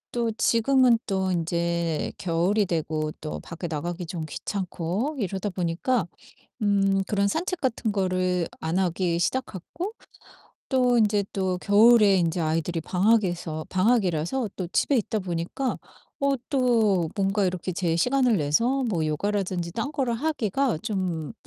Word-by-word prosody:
또 235 -1 +1
지금은 245 0 +4
또 190 -3 0
인제 170 -1 -1
겨울이 185 +4 +1
되고 155 -2 -1
또 155 - -5
밖에 170 +1 -8
나가기 170 +3 -4
좀 165 -1 -5
귀찮고 190 - -3
이러다 195 -1 -2
보니까 180 +5 0 0.6
음 195 -1 +2
그런 200 0 +1
산책 350 - -2
같은 230 -4 -1
거를 185 -3 0
안 165 +3 -1
하기 175 -2 0
시작했고 260 - -3 0.8
또 250 -2 +3
인제 210 -2 +2
또 185 -2 -1
겨울에 210 0 +6
인제 170 -1 0
아이들이 165 +1 -1
방학에서 180 -4 0
방학이라서 195 +2 +1
또 185 - -2
집에 275 +8 +2
있다 220 -1 -1
보니까 180 +8 -3 0.4
어 280 0 +3 0.2
또 230 - +2
뭔가 195 0 +1
이렇게 185 0 -2
제 170 -2 0
시간을 250 +4 +2
내서 230 - +1
뭐 175 -9 0
요가라든지 180 +2 -1
딴 235 +8 -2
거를 260 -5 -1
하기가 265 - 0
좀 185 -8 -3
190 Hz, 280 characters per minute, -25 LUFS, 170-230 Hz, 0.8 s, 겨울에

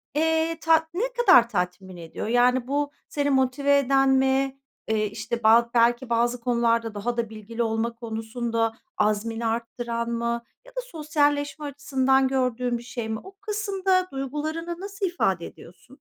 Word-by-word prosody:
eee, 320 +1 +1
tat 320 0 +4
ne 390 +7 -1
kadar 370 - +6
tatmin 180 -1 -3
ediyor? 165 +5 -6
Yani 245 +1 +3
bu, 290 +1 -1 0.2
seni 285 -1 0
motive 275 +2 +3
eden 270 0 +3
mi? 265 0 +2 0.3
Eee, 215 -1 +1
işte, 215 +3 -4
ba 230 +2 +6
belki 240 +1 +3
bazı 240 +1 +1
konularda 230 -2 +1
daha 235 +4 -2
da 230 -2 -1
bilgili 225 +2 -4
olma 225 +1 -1
konusunda, 225 0 -2 0.2
azmini 220 +2 0
arttıran 235 +1 -2
mı? 235 0 -2 0.2
Ya - - -15
da, - - -1
sosyalleşme 295 -6 -1
açısından 265 -1 +1
gördüğün 250 -2 0
bir 235 - -10
şey 235 -2 -5
mi? 220 - -2
O 385 +1 -13
kısımda, 390 -3 0
duygularını 305 +5 -4
nasıl 395 0 -4
ifade 190 - 0
ediyorsun? 175 +8 -14
245 Hz, 150 wpm, -25 LUFS, 230-290 Hz, 0.3 s, kadar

